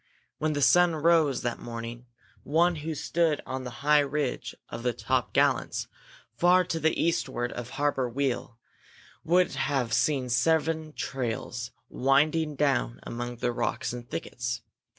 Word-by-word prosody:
When 155 0 0
the 145 -1 0
sun 175 +2 +5
rose 160 -3 +3
that 120 -1 -2
morning 115 +1 -7 0.3
one 170 +3 +2
who 155 +1 -4
stood 160 0 +1
on 130 0 -4
the - - -4 0.2
high 150 0 +6
ridge 145 -1 -2
of 115 - -6
the 125 0 0
Top 130 +2 -1
Gallants, - - +1 0.5
far 180 +5 +5
to 165 - -3
the 160 +1 +1
eastward 120 -7 0
of 120 -1 -6
Harbor 145 -3 +1
Weal, 125 -2 -2 0.7
would 180 +2 +3
have 135 -4 0
seen 130 +1 +1
seven 155 +5 +1
trails 120 -3 -3 0.2
winding 150 +4 +2
down - - +1
among 120 +1 -5
the 120 +1 -1
rocks 120 - -2
and 120 -1 -8
thickets. 120 -1 -4
135 Hz, 145 wpm, -28 LUFS, 120-155 Hz, 0.7 s, high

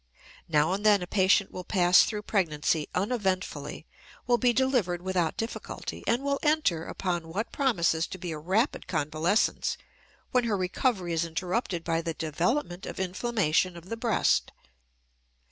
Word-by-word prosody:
Now 155 +2 +2
and 200 +2 -3
then 205 -3 +5
a - - -3
patient 190 +1 +3
will 185 - -6
pass 180 -1 +5
through 210 -2 -4
pregnancy 160 -6 0
uneventfully, 185 - -2 0.4
will 240 0 +3
be 250 -1 +4
delivered 240 -9 +1
without 180 -4 0
difficulty, 225 +1 -5
and 240 +4 +1
will 280 0 0
enter 300 - +1
upon 175 -3 -3
what 200 +8 -3
promises 170 - +1
to - - -7
be 175 -2 -5
a 155 - -5
rapid 195 - 0
convalescence 155 +5 0 0.5
when 250 -1 +2
her 215 -3 +1
recovery 185 -1 0
is 165 0 +1
interrupted 175 +2 -2
by 165 -1 0
the 165 -1 -4
development 175 - -1
of - - -6
inflammation 185 -3 0
of 170 +2 -12
the 230 - -2
breast. 230 0 +1
185 Hz, 150 wpm, -28 LUFS, 165-225 Hz, 0.5 s, then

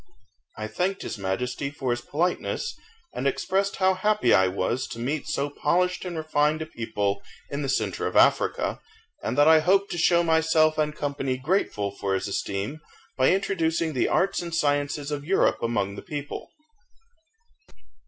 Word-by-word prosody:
I 110 - -4
thanked 180 - -2
his - - -5
Majesty 125 +8 -2
for 135 -3 -3
his 120 0 -1
politeness, 175 - -1 0.4
and 140 - -1
expressed 195 +8 0
how 190 0 +3
happy 210 +3 +2
I 95 +1 +5
was 100 +7 -1
to - - -8
meet 140 +6 -2
so 145 -2 -1
polished 180 +5 0
and 175 -2 -4
refined 155 0 +1
a - - -7
people 105 -7 -2 0.3
in 140 - -2
the 140 - -2
centre 135 - -1
of - - -5
Africa, - - +3 0.4
and - - -3
that 145 +1 +6
I 160 0 +8
hoped 195 +5 +2
to 175 - -3
show 170 +1 +4
myself 160 -1 +3
and 150 0 0
company 140 -3 -2
grateful 130 - 0
for 100 -1 -2
his 95 +1 -2
esteem, 100 +8 -3 0.3
by 130 -1 +4
introducing 165 -4 0
the 130 - +1
arts 195 0 +1
and 170 -1 -4
sciences 145 -1 0
of 145 -1 -3
Europe 190 +6 +2
among 105 -4 -1
the 100 - -8
people. 145 -1 -6
150 Hz, 165 wpm, -26 LUFS, 125-170 Hz, 0.4 s, I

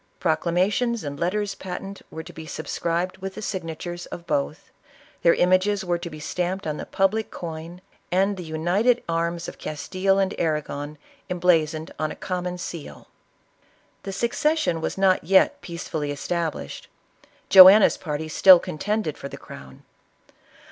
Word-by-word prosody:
Proclamations 185 +8 +1
and 145 -1 -6
letters 200 +3 -1
patent 195 +1 -7
were 160 - -7
to - - -12
be 160 -1 -9
subscribed 170 +4 -3
with 195 0 -6
the - - -7
signatures 175 -2 -5
of 170 - -9
both; 70 - -2 0.5
their 170 - +5
images 190 +2 +2
were 175 -1 0
to 170 - -6
be 155 -1 -10
stamped 180 +4 -3
on 155 -1 -2
the - - -7
public 195 +3 +1
coin, 165 +1 -7 0.3
and 195 +3 +2
the 185 - -7
united 175 +10 +1
arms 170 0 -1
of - - -9
Castile 185 +5 -1
and 195 -1 +1
Arragon 150 -2 -2 0.3
embla 175 -3 +3
zoned 160 +1 -7
on 155 -1 -1
ix - - -9
common 180 -1 -3
seal." 170 -3 -8 0.9
The 195 - -6
succession 235 - 0
was - - -3
not 190 -1 +3
yet 190 +1 +3
peacefully 160 -3 -5
established. 155 - -4 0.6
Joanna's 190 +2 +9
party 155 -1 -4
still 185 +4 +8
contended 185 +1 -3
for 140 - -6
the - - -8
crown. 65 -1 -12
175 Hz, 150 wpm, -24 LUFS, 160-190 Hz, 0.9 s, Joanna's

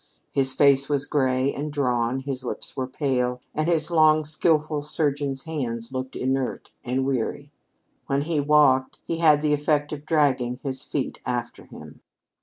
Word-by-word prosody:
His 135 -1 +1
face 140 0 +4
was 145 -1 +1
gray 130 -2 +1
and 150 +2 -4
drawn, 125 -3 0
his 135 -1 -4
lips 125 - -5
were 130 -1 -2
pale, 125 -2 -1
and 155 +1 -1
his 160 -1 +1
long 155 -1 +4
skillful 155 -1 +1
surgeon's 145 -2 -1
hands 125 -6 -4
looked 130 0 -4
inert 130 0 -2
and 130 +2 -1
weary. 135 +2 -2 0.6
When 140 +1 0
he 160 -1 -1
walked, 145 -3 +3
he 165 - -2
had 155 -3 +4
the 150 -1 +2
effect 150 0 0
of 150 0 -8
dragging 130 -6 +2
his 135 -2 -3
feet 135 -1 -4
after 120 -1 -4
him. - - -13
140 Hz, 160 wpm, -24 LUFS, 130-150 Hz, 0.6 s, face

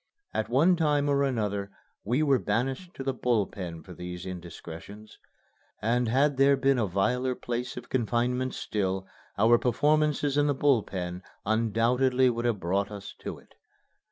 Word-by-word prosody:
At 110 - -1
one 155 +9 +4
time 150 -3 +2
or 140 -1 +2
another 105 -7 -1 0.3
we 125 +8 +1
were 140 -4 +3
banished 135 - -2
to 135 - -5
the 135 0 -1
Bull 120 -4 +1
Pen 85 -5 -7
for 90 - -11
these 90 +1 -7
indiscretions. 90 +3 -9 0.6
And 120 +3 +1
had 135 +4 +2
there 140 0 +5
been 135 -1 +2
a 110 - +1
viler 125 +8 0
place 120 +1 -4
of 125 - -8
confinement 125 +1 0
still, 95 -2 -2 0.3
our 115 +3 +5
performances 150 +2 +2
in 145 - +3
the 145 - +1
Bull 135 -4 +3
Pen 90 -2 -5 0.2
undoubtedly 120 +4 +2
would 120 0 -3
have 115 -4 +1
brought 95 +3 0
us 100 -1 -8
to - - -6
it. - - -20
120 Hz, 160 wpm, -28 LUFS, 100-135 Hz, 0.6 s, there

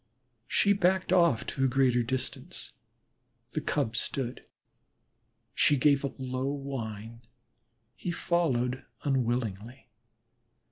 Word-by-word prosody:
She 200 - +4
backed 185 -1 +2
off 170 -10 +4
to 135 - -2
a - - +5
greater 125 -1 +3
distance; 130 +5 -4 0.8
the 155 - -2
Cub 140 -6 -1
stood. 125 +2 -3 1.1
She 145 -2 +4
gave 140 +1 +4
a 140 - -1
low 130 0 -2
whine; 115 -5 -5 0.7
he 175 - -5
followed 130 -8 0 0.2
unwillingly. 120 -3 -1
130 Hz, 100 wpm, -29 LUFS, 120-145 Hz, 1.1 s, a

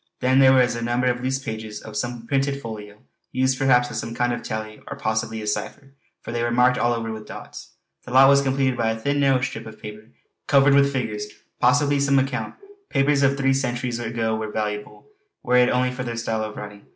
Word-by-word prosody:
Then 130 +1 +3
there 135 -1 +7
were 130 -1 +6
a 120 -1 0
number 120 +2 0
of 125 0 0
loose 130 +1 0
pages 110 -4 -6
of 110 - -11
some 120 0 -4
printed 140 +2 0
folio, 105 -4 -9 0.3
used 130 0 +1
perhaps 125 -3 +3
as - - -3
some 115 0 -5
kind 120 0 +1
of 120 - -4
tally 110 0 -6
or - - -6
possibly 110 0 -2
a - - -5
cipher, 135 +6 -4 0.3
for - - -6
they 120 0 -2
were 120 - 0
marked 125 +1 +3
all 120 - +2
over 115 -1 -4
with 110 -1 -8
dots. - - -10 0.3
The 125 - -9
lot 130 +1 +7
was 140 0 +5
completed 135 -1 +1
by 115 -2 0
a 110 - -2
thin, 140 +5 0
narrow 135 -2 +3
strip 115 -3 -4
of 110 - -11
paper 105 +1 -10 0.4
covered 135 -1 +5
with 140 0 +4
figures 110 -6 -3 0.3
possibly 145 +3 +3
some 140 0 +3
account. 135 -1 -1 0.3
Papers 140 +1 +2
of 140 0 +3
three 135 0 +2
centuries 125 -2 -2
ago 115 -1 -2
were 110 0 -4
valuable, 105 -1 -4 0.4
were 125 0 +3
it 125 0 +5
only 125 0 +1
for 125 0 -6
their 120 -1 -5
style 110 -2 -2
of 110 -1 -6
writing. 105 -1 -9
125 Hz, 225 wpm, -23 LUFS, 110-135 Hz, 0.4 s, there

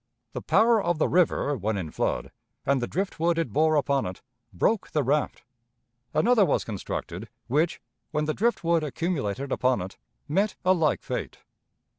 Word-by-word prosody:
The - - -4
power 225 0 +4
of 175 -4 0
the 155 - +2
river 165 -4 +2
when 110 -2 -2
in 85 -5 -4
flood, - - -2 0.3
and 140 -1 +2
the 120 - -1
drift 195 -1 -3
wood 170 +1 +2
it 165 -11 -1
bore 155 +3 +3
upon 140 -5 +1
it, 90 - -8 0.3
broke 190 - 0
the 150 -3 0
raft; 145 +1 0 0.7
another 225 +7 +4
was - - +1
constructed, 105 -4 -5 0.2
which, 150 +7 +1 0.3
when 150 0 -1
the 155 - 0
drift 230 +2 0
wood 165 -1 +2
accumulated 140 - -2
upon 130 0 +2
it, 95 +2 -7 0.3
met 195 +7 +1
a 185 - +6
like 160 -5 +1
fate. - - -4
155 Hz, 170 wpm, -26 LUFS, 130-175 Hz, 0.7 s, a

